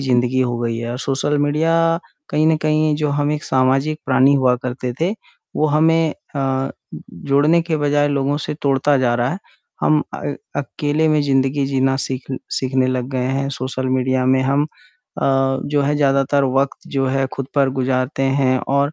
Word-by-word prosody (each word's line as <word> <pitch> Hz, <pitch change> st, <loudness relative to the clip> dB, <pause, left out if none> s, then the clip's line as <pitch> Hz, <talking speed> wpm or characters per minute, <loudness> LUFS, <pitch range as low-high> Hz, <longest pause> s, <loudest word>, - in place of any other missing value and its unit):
ज़िंदगी 125 Hz, -1 st, +1 dB
हो 120 Hz, -2 st, 0 dB
गई 115 Hz, -1 st, -2 dB
है 115 Hz, 0 st, -4 dB
और 125 Hz, -, -4 dB
सोशल 140 Hz, +2 st, 0 dB
मीडिया 165 Hz, +3 st, +2 dB, 0.3 s
कहीं 155 Hz, +1 st, +2 dB
न 160 Hz, -1 st, +4 dB
कहीं 155 Hz, 0 st, +2 dB
जो 150 Hz, -1 st, -1 dB
हम 145 Hz, +1 st, 0 dB
एक 150 Hz, -, -4 dB
सामाजिक 135 Hz, +4 st, +1 dB
प्राणी 135 Hz, +2 st, +4 dB
हुआ 130 Hz, -2 st, +3 dB
करते 125 Hz, 0 st, -4 dB
थे 170 Hz, +4 st, +2 dB, 0.5 s
वो 155 Hz, -, +2 dB
हमें 160 Hz, +1 st, +3 dB, 0.2 s
अ, 135 Hz, -1 st, -1 dB, 0.5 s
जोड़ने 145 Hz, +5 st, +3 dB
के 165 Hz, -2 st, -1 dB
बजाय 145 Hz, 0 st, +1 dB
लोगों 140 Hz, 0 st, 0 dB
से 150 Hz, -, -4 dB
तोड़ता 140 Hz, +1 st, +2 dB
जा 120 Hz, -2 st, +2 dB
रहा 120 Hz, +2 st, 0 dB
है, 185 Hz, -, -4 dB, 0.4 s
हम 155 Hz, -1 st, +3 dB
अ, -, -, -5 dB, 0.4 s
अकेले 150 Hz, +2 st, -1 dB
में 155 Hz, -1 st, +3 dB
ज़िंदगी 135 Hz, 0 st, +1 dB
जीना 135 Hz, -1 st, +1 dB
सीख 130 Hz, -1 st, -2 dB, 0.3 s
सीखने 130 Hz, 0 st, +1 dB
लग 130 Hz, -1 st, -2 dB
गए 130 Hz, -1 st, -1 dB
हैं, 135 Hz, +1 st, -1 dB
सोशल 130 Hz, 0 st, -3 dB
मीडिया 130 Hz, 0 st, +1 dB
में 130 Hz, 0 st, +3 dB
हम 140 Hz, +2 st, +1 dB
अ, 135 Hz, -, -2 dB
जो 145 Hz, 0 st, 0 dB
है 145 Hz, +1 st, +1 dB
ज़्यादातर 140 Hz, 0 st, +2 dB
वक़्त 140 Hz, 0 st, -2 dB
जो 135 Hz, -1 st, 0 dB
है 135 Hz, 0 st, 0 dB
खुद 135 Hz, -1 st, -4 dB
पर 140 Hz, -2 st, +3 dB
गुज़ारते 130 Hz, +1 st, -1 dB
हैं 135 Hz, -1 st, +2 dB
और 140 Hz, +2 st, +1 dB
135 Hz, 180 wpm, -19 LUFS, 130-150 Hz, 0.5 s, न